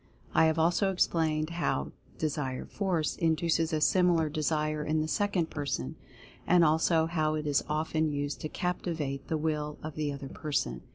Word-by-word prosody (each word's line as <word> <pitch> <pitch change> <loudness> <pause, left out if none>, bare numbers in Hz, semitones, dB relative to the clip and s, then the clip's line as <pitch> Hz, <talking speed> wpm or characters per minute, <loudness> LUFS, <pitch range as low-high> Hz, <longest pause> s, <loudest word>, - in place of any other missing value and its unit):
I - - +5
have 160 0 +2
also 175 +4 +3
explained 160 -3 +1
how 170 - -1 0.3
Desire 145 -4 -2
Force 180 -6 -1
induces 165 0 +1
a 155 - +1
similar 170 -1 +3
Desire 155 0 -1
in 155 +1 0
the 155 - 0
second 190 -2 0
person; 140 - -3 0.5
and 175 -1 +6
also 160 +1 +3
how 155 -2 0
it 155 0 -3
is 145 -1 +2
often 155 +1 0
used 145 0 -3
to 155 - -3
captivate 160 -7 -3
the 160 - 0
Will 150 -1 -2
of 155 0 -5
the 150 -1 -2
other 140 -1 -7
person. 140 - -2
155 Hz, 165 wpm, -30 LUFS, 150-165 Hz, 0.5 s, and